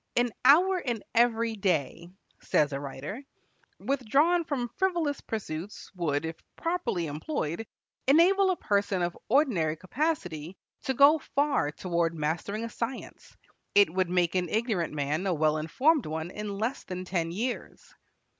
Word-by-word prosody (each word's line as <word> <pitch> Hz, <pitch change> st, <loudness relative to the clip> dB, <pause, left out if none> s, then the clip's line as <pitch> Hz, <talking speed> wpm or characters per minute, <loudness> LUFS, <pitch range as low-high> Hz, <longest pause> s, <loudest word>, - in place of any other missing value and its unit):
"An 240 Hz, 0 st, +2 dB
hour 360 Hz, +8 st, +6 dB
in 240 Hz, -8 st, -3 dB
every 230 Hz, -1 st, +2 dB
day," 170 Hz, -4 st, -1 dB, 0.3 s
says 145 Hz, -1 st, +1 dB
a 135 Hz, -, -2 dB
writer, 145 Hz, -, -6 dB, 0.6 s
"withdrawn 275 Hz, -, +2 dB
from 250 Hz, -6 st, -2 dB
frivolous 340 Hz, -7 st, 0 dB
pursuits, 200 Hz, -3 st, -6 dB
would, 160 Hz, -5 st, -1 dB
if 160 Hz, 0 st, -4 dB, 0.2 s
properly 335 Hz, -, -1 dB
employed, 160 Hz, -, -3 dB, 0.4 s
enable 370 Hz, +7 st, +5 dB
a 370 Hz, -, +2 dB
person 200 Hz, -, 0 dB
of 175 Hz, 0 st, -2 dB
ordinary 215 Hz, -, +2 dB
capacity 185 Hz, -, -3 dB, 0.3 s
to 265 Hz, -, 0 dB
go 285 Hz, +4 st, +7 dB, 0.2 s
far 280 Hz, -, +2 dB
toward 170 Hz, +1 st, -1 dB
mastering 165 Hz, +8 st, -2 dB
a 230 Hz, -, -4 dB
science. 235 Hz, +3 st, -6 dB, 0.4 s
It 200 Hz, -5 st, +6 dB
would 185 Hz, -1 st, +1 dB
make 180 Hz, -1 st, +2 dB
an 180 Hz, -2 st, 0 dB
ignorant 215 Hz, -6 st, 0 dB
man 150 Hz, +6 st, -1 dB
a 180 Hz, -, +1 dB
well 155 Hz, 0 st, +2 dB
informed 260 Hz, -, +2 dB
one 160 Hz, +2 st, -4 dB
in 210 Hz, -1 st, -5 dB
less 230 Hz, +6 st, -2 dB
than 185 Hz, 0 st, -6 dB
ten 170 Hz, -3 st, -1 dB
years." 235 Hz, +8 st, -5 dB
200 Hz, 145 wpm, -28 LUFS, 165-270 Hz, 0.6 s, go